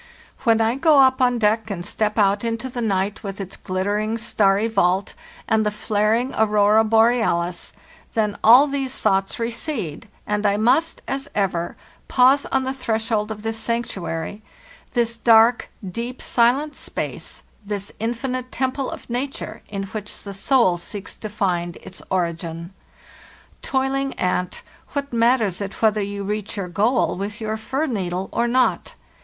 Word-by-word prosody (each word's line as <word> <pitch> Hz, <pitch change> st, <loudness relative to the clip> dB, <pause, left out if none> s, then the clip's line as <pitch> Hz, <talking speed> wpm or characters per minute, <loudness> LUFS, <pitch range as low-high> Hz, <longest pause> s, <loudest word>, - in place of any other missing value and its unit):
When 225 Hz, -1 st, +4 dB
I 225 Hz, +1 st, +2 dB
go 310 Hz, +1 st, +5 dB
up 260 Hz, -1 st, +5 dB
on 245 Hz, -1 st, +3 dB
deck 220 Hz, 0 st, +1 dB
and 175 Hz, -3 st, -4 dB
step 215 Hz, 0 st, -1 dB
out 205 Hz, 0 st, +3 dB
into 230 Hz, +2 st, -2 dB
the 245 Hz, -, -4 dB
night 200 Hz, -2 st, 0 dB
with 200 Hz, -2 st, -6 dB
its 195 Hz, -1 st, -6 dB
glittering 205 Hz, +4 st, -1 dB
starry 210 Hz, -2 st, +2 dB
vault 195 Hz, -3 st, +1 dB, 0.3 s
and 220 Hz, 0 st, +3 dB
the 210 Hz, -, +1 dB
flaring 215 Hz, +4 st, 0 dB
aurora 210 Hz, 0 st, +4 dB
borealis, 220 Hz, -6 st, +2 dB, 0.4 s
then 210 Hz, -2 st, +1 dB
all 245 Hz, +6 st, +8 dB
these 275 Hz, -2 st, -2 dB
thoughts 195 Hz, 0 st, +1 dB
recede, 230 Hz, -, -4 dB, 0.2 s
and 210 Hz, 0 st, -1 dB
I 205 Hz, -1 st, +2 dB
must, 280 Hz, +10 st, +2 dB
as 275 Hz, +1 st, -3 dB
ever, 185 Hz, -4 st, -1 dB, 0.3 s
pause 265 Hz, +2 st, +4 dB
on 265 Hz, -1 st, +1 dB
the 260 Hz, 0 st, -2 dB
threshold 225 Hz, -4 st, -1 dB
of 215 Hz, -1 st, -6 dB
this 225 Hz, 0 st, -2 dB
sanctuary—this 230 Hz, -, -4 dB
dark, 230 Hz, +1 st, +5 dB, 0.2 s
deep, 235 Hz, +7 st, -5 dB
silent 260 Hz, +6 st, +2 dB
space, -, -, -5 dB, 0.2 s
this 200 Hz, -1 st, -4 dB
infinite 250 Hz, +3 st, -3 dB
temple 260 Hz, +1 st, -1 dB
of -, -, -8 dB
nature, 255 Hz, +3 st, -4 dB
in 200 Hz, -1 st, -3 dB
which 210 Hz, +1 st, -6 dB
the 200 Hz, -, -7 dB
soul 195 Hz, -4 st, +2 dB
seeks 195 Hz, +3 st, -6 dB
to 215 Hz, -, -6 dB
find 180 Hz, -5 st, -1 dB
its 185 Hz, -, -10 dB
ori 175 Hz, -3 st, +1 dB
gin. 165 Hz, +2 st, -7 dB, 0.9 s
Toiling 270 Hz, +1 st, -1 dB
ant, 180 Hz, 0 st, -1 dB, 0.3 s
what 280 Hz, -2 st, -3 dB
matters 230 Hz, -5 st, +2 dB
it 200 Hz, 0 st, -5 dB
whether 215 Hz, -1 st, +3 dB
you 200 Hz, 0 st, -4 dB
reach 210 Hz, +1 st, -3 dB
your 190 Hz, -3 st, -3 dB
goal 220 Hz, +7 st, +1 dB
with 205 Hz, +3 st, -5 dB
your 220 Hz, -1 st, -2 dB
fir 265 Hz, +7 st, -2 dB
needle 190 Hz, -, -3 dB
or 235 Hz, -, +1 dB
not? 255 Hz, +2 st, +1 dB
220 Hz, 150 wpm, -22 LUFS, 200-245 Hz, 0.9 s, all